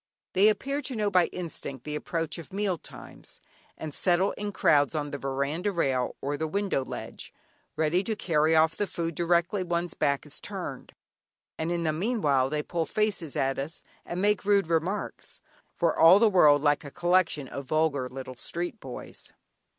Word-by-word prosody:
They 195 +3 +5
appear 275 +6 -1
to 270 -3 -4
know 210 -2 0
by 180 -2 +4
instinct 155 -7 -6
the 150 - -5
approach 165 +2 -3
of 165 - -11
meal 195 -3 -1
times, - - -13 0.4
and 155 -2 -6
settle 185 +4 +3
in 205 0 -4
crowds 145 -5 +3
on 145 -1 -2
the 140 - -4
veranda 140 +8 -1
rail 135 -8 0
or 145 +1 -2
the 160 +2 -2
window 195 -5 0
ledge, - - -7 0.4
ready 160 +4 +1
to 220 - -1
carry 160 -5 +2
off 160 0 +4
the 205 - -1
food 170 -1 -3
directly 170 +4 +1
one's 175 -1 -2
back 140 -1 0
is - - -10
turned, - - -6 0.6
and 160 +2 -2
in 170 -1 -1
the 155 -1 +1
meanwhile 155 - +1
they 150 0 -1
pull 165 0 -2
faces 210 -8 -1
at 135 0 0
us, 150 +4 -5 0.2
and 175 - -5
make 210 0 +2
rude 200 -1 +3
remarks, 170 +5 -2 0.4
for 170 -2 +1
all 165 +4 +8
the 220 0 +4
world 150 -6 +6
like 145 0 +3
a 145 - -7
collection 175 -3 +1
of 140 +1 -6
vulgar 145 -3 0
little 130 0 -7
street 175 - -4
boys. 130 -7 -9
165 Hz, 180 wpm, -28 LUFS, 145-185 Hz, 0.6 s, all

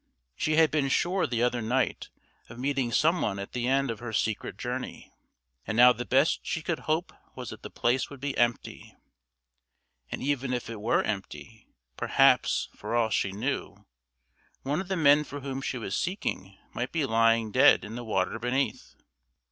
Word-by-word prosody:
She 155 - 0
had 160 -1 +5
been 145 -3 +1
sure 180 +7 +1
the 120 -2 0
other 125 -1 +1
night 125 +4 -1 0.4
of 115 - -11
meeting 135 -1 -1
some 165 +7 +3
one 100 -1 -1
at 100 0 -6
the 125 -1 -2
end 135 0 +2
of 110 - -7
her 120 -1 -6
secret 110 0 -2
journey, - - -5 0.6
and 110 - -2
now 125 +1 +8
the 120 - -5
best 135 +5 +3
she 160 - -3
could 165 0 -2
hope 160 +3 0 0.2
was - - -7
that - - -10
the - - -8
place 120 +2 0
would 140 - -10
be 140 +1 -3
empty; 120 -1 -1 1.2
and - - -4
even 135 -2 -1
if 120 -2 -3
it 110 -2 -7
were 110 - +2
empty, 110 +2 -6 0.3
perhaps, - - +3
for - - -4
all 115 -2 +2
she 100 - 0
knew, 105 -2 -4 0.8
one 145 +6 -1
of 190 - -8
the 190 -1 -1
men 150 -1 +5
for 145 -1 -8
whom 135 0 -4
she 130 - -3
was 105 -5 -4
seeking 100 - -3 0.2
might 125 +2 -3
be 160 -4 0
lying 115 -1 +2
dead 130 -1 +5
in 105 - -8
the 120 +1 -6
water 95 -5 -1
beneath. 130 +3 -2
125 Hz, 185 wpm, -28 LUFS, 115-140 Hz, 1.2 s, now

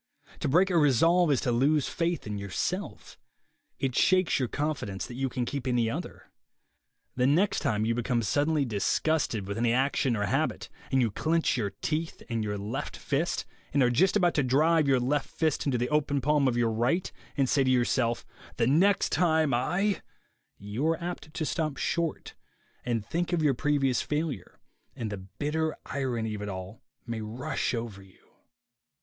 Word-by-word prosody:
To - - -1
break 180 +7 +3
a 175 - +3
resolve 165 +5 +4
is 135 - +2
to 125 - 0
lose 140 +4 +2
faith 170 -2 -1
in 105 -1 -4
yourself. 100 -2 -4 0.6
It 135 -2 -1
shakes 185 -3 +3
your 130 - 0
confidence 135 -10 -3
that - - -9
you 135 +2 -2
can 125 -1 -2
keep 135 0 -4
any 120 -3 +1
other. - - -7 0.8
The 125 0 +2
next 180 +9 +3
time 105 -1 0
you 115 - +1
become 120 0 0
sud 145 +8 +1
denly 150 -4 +1
disgusted 115 0 0
with 100 +2 -3
any 120 0 +2
action 130 0 +1
or 105 -1 0
habit, - - -1 0.2
and 135 - +3
you 115 -3 +1
clench 160 +9 +1
your 110 -5 -1
teeth 160 +1 -2
and 115 -1 0
your 105 -1 -2
left 115 +8 -4
fist, 150 +4 -1 0.3
and 140 - +5
are 120 - +3
just 185 - +3
about 175 -4 +3
to 145 - +2
drive 155 +4 +3
your 135 -2 +4
left 135 +4 0
fist 155 -2 -1
into 130 -3 +1
the 120 +1 -1
open 150 -2 +1
palm 145 +1 +2
of 120 -2 +1
your 115 -1 +2
right, 120 +11 0 0.3
and 135 -2 +3
say 140 +1 +3
to 130 - +1
yourself, 120 -1 +1 0.3
"The 115 - +2
next 180 +10 +3
time 160 -5 +2
I 180 +12 +1 0.2
— - - -43
" - - -51
you 105 +9 -3
are 165 0 +1
apt 175 -3 -6
to 155 - -3
stop 155 -2 -2
short 170 -2 -2 0.5
and 115 -4 -1
think 170 - -2
of 165 -2 +1
your 145 -3 +4
previous 135 -1 +1
failure, 150 - -3 0.4
and 110 -3 -4
the 100 - -3
bitter 155 +8 -2
irony 120 -5 -2
of 105 - -5
it 105 - -4
all 95 +2 -7 0.2
may 115 -2 -4
rush 115 +3 -2
over 115 -4 -5
you. 95 -1 -21
135 Hz, 190 wpm, -28 LUFS, 115-155 Hz, 0.8 s, and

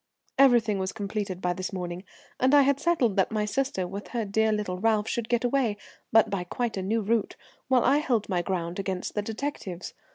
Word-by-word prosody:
"Everything 235 -6 +5
was 190 0 -2
completed 200 -3 -4
by 180 0 +1
this 185 +3 -4
morning, 180 -1 -5 0.4
and 260 +3 +4
I 285 - +7
had 280 0 +2
settled 270 - +1
that 190 - +3
my 215 -1 0
sister, 260 -5 -1
with 200 +3 -7
her 235 -3 -2
dear 220 +2 +2
little 205 -4 -2
Ralph, 215 0 +2
should 235 -2 -2
get 240 0 +1
away, 245 -4 +1 0.3
but 225 -2 +6
by 195 -3 -1
quite 235 +5 -3
a 190 - -2
new 220 +4 0
route, 220 +1 0 0.3
while 255 -2 +4
I 275 +3 +4
held 240 -8 0
my 180 -3 0
ground 175 -1 -3
against 190 -2 -3
the 210 - 0
detectives. 215 -5 -5
210 Hz, 205 wpm, -27 LUFS, 190-240 Hz, 0.4 s, I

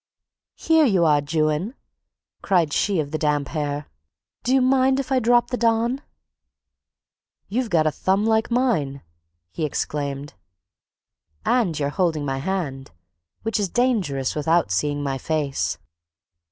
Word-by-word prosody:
"Here 320 -1 +3
you 190 -6 +3
are, 150 -2 +4
Juan," 155 - -1 0.7
cried 170 -6 +2
she 200 -4 +1
of 145 -2 -2
the 155 - -2
damp 145 -3 0
hair. 145 -2 -3 0.6
"Do 250 - -1
you 265 - +5
mind 265 +1 +3
if 275 0 -4
I 265 - +4
drop 240 +1 +3
the 250 - 0
Don?" 235 +3 +1 1.5
"You've 240 +3 -1
got 165 -4 +3
a 155 - +2
thumb 195 +6 0
like 220 0 +2
mine!" 215 - 0 0.5
he 160 - -4
exclaimed. 145 -1 -3 1.1
"And 225 -10 +2
you're 140 -1 0
holding 160 -3 0
my 135 -1 -2
hand, 140 -5 -3 0.5
which 225 -1 -1
is 200 -3 0
dangerous 195 - 0
without 160 -4 +1
seeing 145 +9 0
my 135 -1 -2
face." 150 -2 -1
165 Hz, 140 wpm, -23 LUFS, 145-235 Hz, 1.5 s, you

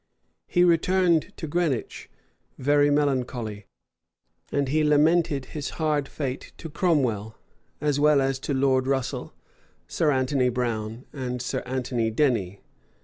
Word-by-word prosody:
He 175 - +3
returned 175 0 +3
to - - -5
Greenwich 155 -5 -2 0.5
very 145 +2 +3
melancholy; 125 -7 -1 0.8
and 140 -1 0
he 155 +4 +1
much 150 - +2
lamented 150 -2 +3
his 150 -2 -4
hard 150 -3 0
fate 135 -3 -5
to 165 - -8
Cromwell, 120 - 0 0.4
as 145 -1 0
well 150 -1 +5
as 135 -1 0
to 140 - -3
Lord 130 -1 +2
Russel, 135 -2 -2 0.6
Sir 155 -2 +1
Anthony 130 -1 +1
Brown, 115 -1 -3
and 125 -3 -4
Sir 125 - -2
Anthony 125 -3 -1
Denny. 110 -7 0
135 Hz, 130 wpm, -25 LUFS, 125-150 Hz, 0.8 s, well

